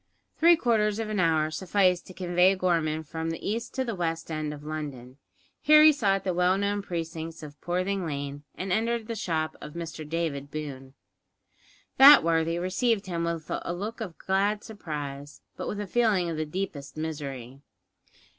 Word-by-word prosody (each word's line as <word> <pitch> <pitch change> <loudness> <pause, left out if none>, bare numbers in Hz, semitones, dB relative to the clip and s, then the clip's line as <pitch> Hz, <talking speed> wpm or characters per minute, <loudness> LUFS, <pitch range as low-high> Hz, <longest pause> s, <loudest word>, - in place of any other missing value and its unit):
Three 340 +1 +6
quarters 220 -7 +1
of 225 -1 -3
an 210 - -1
hour 160 -3 +2
sufficed 185 +1 +1
to 185 - -11
convey 180 +1 +3
Gorman 165 -4 0
from 160 +2 -4
the 165 - -5
east 225 +3 -3
to 260 - 0
the 230 - -2
west 165 -3 -3
end 155 -1 -2
of 145 -1 -9
London. 145 -5 -6 0.4
Here 305 +1 +7
he 310 - +9
sought 195 -8 +1
the 185 - -1
well 180 +2 +3
known 200 +1 0
precincts 165 -3 -5
of 145 -1 -11
Poorthing 185 +2 -1
Lane, 145 -2 -4
and 185 0 -4
entered 230 +1 0
the 230 - -4
shop 160 -7 -2
of 150 - -8
Mr 160 -2 -6
David 155 -4 -2
Boone. 140 -3 -7 1.0
That 280 +2 +10
worthy 165 0 +1
received 195 +4 0
him 170 -2 -2
with 165 -2 -3
a 175 - -3
look 215 +6 -5
of 185 -7 -6
glad 200 +2 0
surprise; 145 -8 -7
but - - -5
with 205 - -3
a 205 - -3
feeling 200 -5 +1
of 160 - -4
the 155 0 -2
deepest 155 -5 -5
misery. 140 -5 -5
170 Hz, 175 wpm, -27 LUFS, 155-200 Hz, 1.0 s, That